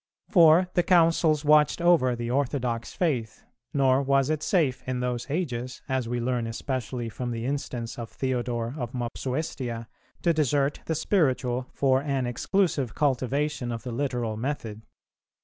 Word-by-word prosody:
For 170 -1 +6
the 175 - +3
Councils 165 -3 +3
watched 150 +2 +5
over 170 -8 +4
the 120 0 -4
orthodox 125 -3 -1
faith; 130 - -2 0.3
nor 135 -1 +3
was 135 +1 +2
it 155 -1 -1
safe 155 - +1
in 130 -1 -1
those 125 +1 -3
ages, 130 -6 -3
as 130 -3 -1
we 120 0 -1
learn 120 -1 -1
especially 120 0 -3
from 120 +2 -5
the 115 -1 -3
instance 125 -4 -4
of 115 -2 -6
Theodore 120 -2 -2
of 120 0 -4
Mopsuestia, 125 -1 -3 0.4
to 170 - +3
desert 145 -2 +1
the 160 - 0
spiritual 130 -7 +1
for 135 -1 +3
an 140 -3 -1
exclusive 140 - 0
cultivation 140 -1 0
of 115 -1 -5
the 125 - -5
literal 120 -4 -2
method. 115 -4 -4
130 Hz, 150 wpm, -26 LUFS, 120-150 Hz, 0.4 s, For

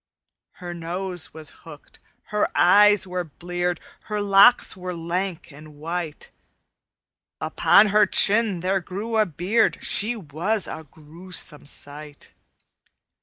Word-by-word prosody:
"Her 175 -1 -8
nose 175 +1 -6
was 155 -1 -10
hooked, 150 -3 -14 0.3
her 210 - +1
eyes 205 +2 +5
were 180 -1 -3
bleared, 175 +2 -4 0.3
Her 210 0 -3
locks 200 +4 +5
were 180 -1 -6
lank 170 +1 -4
and 150 +1 -14
white; 165 +1 -6 1.1
Upon 210 +1 +4
her 210 0 +4
chin 205 -2 +2
there 190 +2 0
grew 205 +5 -4
a 215 - +3
beard; 185 +8 0
She 220 +4 +1
was 190 +3 -2
a 160 - -8
gruesome 160 0 -4
sight. 145 +1 -8
180 Hz, 120 wpm, -23 LUFS, 160-200 Hz, 1.1 s, eyes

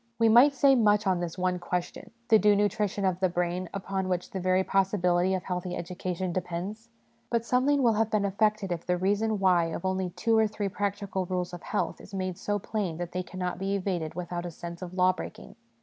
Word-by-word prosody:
We 225 -1 +4
might 255 +6 +7
say 275 +1 +5
much 210 -4 +3
on 185 -2 +2
this 175 0 -4
one 180 0 0
question, 175 0 -4 0.2
the 220 -2 +7
due 210 0 +5
nutrition 205 -1 0
of 185 -1 +1
the 185 -1 +2
brain, 175 +1 -2
upon 190 -1 -3
which 180 -1 -2
the 190 - -3
very 185 +1 +2
possibility 190 -2 +2
of 185 - -3
healthy 180 -1 -3
education 180 +1 -4
depends. 185 +6 -4 0.4
But 235 -1 0
something 265 +3 +2
will 230 -2 +5
have 220 +1 +1
been 215 -2 +1
effected 210 0 +1
if 170 -1 -3
the 180 0 0
reason 205 +4 +1
why 185 -3 +3
of 165 +2 -5
only 185 -1 0
two 225 +6 0
or 220 - +4
three 205 -1 -3
practical 200 -1 -2
rules 180 -1 -2
of 175 - -7
health 220 -5 -2
is 195 - -10
made 185 -2 -3
so 205 0 -1
plain 195 -5 -3
that 175 0 -5
they 185 - -2
cannot 180 0 -4
be 195 +1 -1
evaded 175 -5 -2
without 175 0 -4
a - - -4
sense 170 +1 -8
of 180 0 -7
law 185 0 +4
breaking. - - -9
190 Hz, 215 wpm, -28 LUFS, 180-210 Hz, 0.4 s, might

